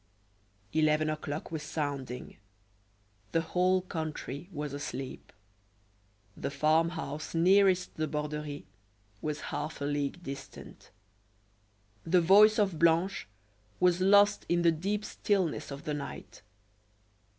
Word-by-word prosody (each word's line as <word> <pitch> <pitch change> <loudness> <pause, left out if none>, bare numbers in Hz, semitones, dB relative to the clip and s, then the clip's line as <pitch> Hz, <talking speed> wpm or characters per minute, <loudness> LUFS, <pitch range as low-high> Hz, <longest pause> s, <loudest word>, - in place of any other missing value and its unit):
Eleven 155 0 +2
o'clock 155 0 -5
was 160 -2 -3
sounding; 140 -5 -4 1.0
the 165 - +3
whole 185 +2 +1
country 160 -2 -5
was 150 -3 -5
asleep. 135 -2 -6 1.0
The - - -3
farm 155 +3 +2
house 155 -2 -5
nearest 185 +1 +4
the 155 0 0
Borderie 150 -1 -4 0.6
was 150 0 -3
half 150 +2 -4
a 140 - -2
league 145 +4 -2
distant. 135 -3 -9 1.1
The 180 +2 +3
voice 205 +5 +6
of 195 -7 +1
Blanche 170 - +2 0.5
was 180 0 +3
lost 205 +2 +5
in 175 0 +2
the 170 - +6
deep 200 +6 -2
stillness 180 -7 -1
of 140 0 -7
the 150 - -3
night. 145 -1 -7
160 Hz, 115 wpm, -30 LUFS, 150-180 Hz, 1.1 s, voice